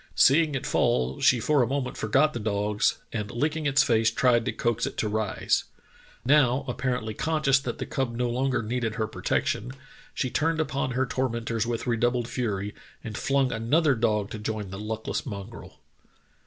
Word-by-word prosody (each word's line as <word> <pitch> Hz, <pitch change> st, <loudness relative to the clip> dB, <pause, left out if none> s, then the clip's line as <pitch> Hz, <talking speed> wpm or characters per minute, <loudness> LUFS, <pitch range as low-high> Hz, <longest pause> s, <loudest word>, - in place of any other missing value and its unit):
Seeing 150 Hz, +1 st, +4 dB
it 135 Hz, -, -3 dB
fall, 65 Hz, +1 st, +1 dB
she 125 Hz, -, +5 dB
for 145 Hz, +4 st, +2 dB
a 120 Hz, -, +2 dB
moment 135 Hz, 0 st, -2 dB
forgot 140 Hz, +8 st, +2 dB
the 120 Hz, -, -3 dB
dogs, 105 Hz, -1 st, 0 dB, 0.2 s
and 105 Hz, -2 st, -3 dB
licking 150 Hz, +6 st, -1 dB
its 135 Hz, 0 st, +4 dB
face 115 Hz, -4 st, +3 dB
tried 120 Hz, -1 st, +2 dB
to -, -, 0 dB
coax 115 Hz, -1 st, -1 dB
it -, -, -7 dB
to 110 Hz, -, 0 dB
rise. 105 Hz, -1 st, 0 dB, 0.6 s
Now, 135 Hz, -2 st, +4 dB
apparently 125 Hz, -3 st, -2 dB
conscious 145 Hz, 0 st, +2 dB
that 125 Hz, -3 st, -5 dB
the -, -, -4 dB
cub 125 Hz, -3 st, -2 dB
no 125 Hz, +1 st, 0 dB
longer 125 Hz, 0 st, 0 dB
needed 115 Hz, -1 st, -2 dB
her 110 Hz, -2 st, 0 dB
protection, 125 Hz, +3 st, -2 dB, 0.4 s
she 130 Hz, -, -1 dB
turned 160 Hz, +1 st, +1 dB
upon 135 Hz, -4 st, -1 dB
her 130 Hz, +1 st, +1 dB
tormentors 115 Hz, -3 st, -2 dB
with 120 Hz, -1 st, -2 dB
redoubled 120 Hz, 0 st, +1 dB
fury, 105 Hz, -5 st, -2 dB, 0.3 s
and 110 Hz, -3 st, -6 dB
flung 135 Hz, +2 st, +1 dB
another 140 Hz, +7 st, +2 dB
dog 105 Hz, -4 st, 0 dB
to 110 Hz, -, -5 dB
join 105 Hz, -2 st, -4 dB
the 95 Hz, -, -6 dB
luckless 110 Hz, +1 st, -3 dB
mongrel. 105 Hz, -2 st, -8 dB
120 Hz, 175 wpm, -26 LUFS, 110-135 Hz, 0.6 s, she